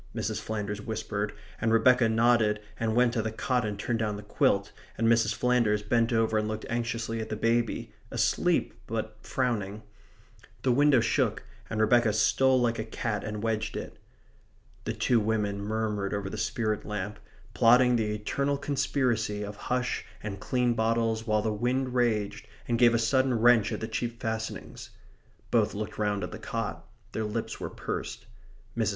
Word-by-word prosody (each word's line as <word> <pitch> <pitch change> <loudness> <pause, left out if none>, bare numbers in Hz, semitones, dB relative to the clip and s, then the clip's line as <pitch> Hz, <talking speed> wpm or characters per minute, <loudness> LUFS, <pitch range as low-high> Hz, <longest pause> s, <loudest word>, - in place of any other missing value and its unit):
Mrs. - - -2
Flanders 105 -1 -3
whispered, 105 -1 -3 0.3
and 115 0 +2
Rebecca 120 +1 +5
nodded 110 -2 +3 0.2
and 110 -1 0
went 120 -1 +4
to 115 - +1
the 110 0 -3
cot 125 +3 0
and 105 -2 -3
turned 115 +3 -1
down 105 -2 -1
the 105 - -9
quilt, 100 -1 +1 0.3
and 115 - +2
Mrs. 115 -2 +3
Flanders 120 -4 +2
bent 115 +3 +2
over 110 -1 +2
and 105 - -1
looked 110 0 -4
anxiously 115 -1 -2
at 110 - -6
the - - -2
baby, 115 +1 0 0.2
asleep, - - +1
but 110 -1 -3
frowning. 110 -5 -2 0.8
The 130 - +3
window 140 0 +5
shook, - - +1 0.3
and 110 - -3
Rebecca 110 0 +4
stole 130 +5 +3
like 120 -2 +1
a - - -1
cat 110 -1 -3
and 105 0 -5
wedged 110 -1 -1
it. - - -7 0.9
The - - -1
two 120 - +2
women 105 -2 0
murmured 105 -1 -1
over 100 -1 -3
the - - -5
spirit 110 -2 -1
lamp, 105 0 -4 0.3
plotting 125 +1 +5
the 110 -2 0
eternal 140 +7 -1
conspiracy 130 -7 0
of 105 0 -6
hush 125 0 0 0.2
and 100 -2 -5
clean 125 +3 +1
bottles 115 0 0
while 110 -1 +2
the 110 - 0
wind 125 +4 -1
raged 115 -5 0 0.2
and 115 -1 0
gave 120 -1 +6
a - - +4
sudden 130 +3 +2
wrench 120 -1 +5
at - - -3
the 110 - -2
cheap 115 +1 -3
fastenings. 110 -1 -5 0.6
Both - - +2
looked 105 +1 -5
round 105 -2 0
at 90 - -4
the 105 - -7
cot. 105 -7 -4 0.2
Their 110 - -2
lips 110 +2 -4
were - - -4
pursed. - - -5 0.5
Mrs. 110 -3 +1
110 Hz, 170 wpm, -28 LUFS, 105-120 Hz, 0.9 s, gave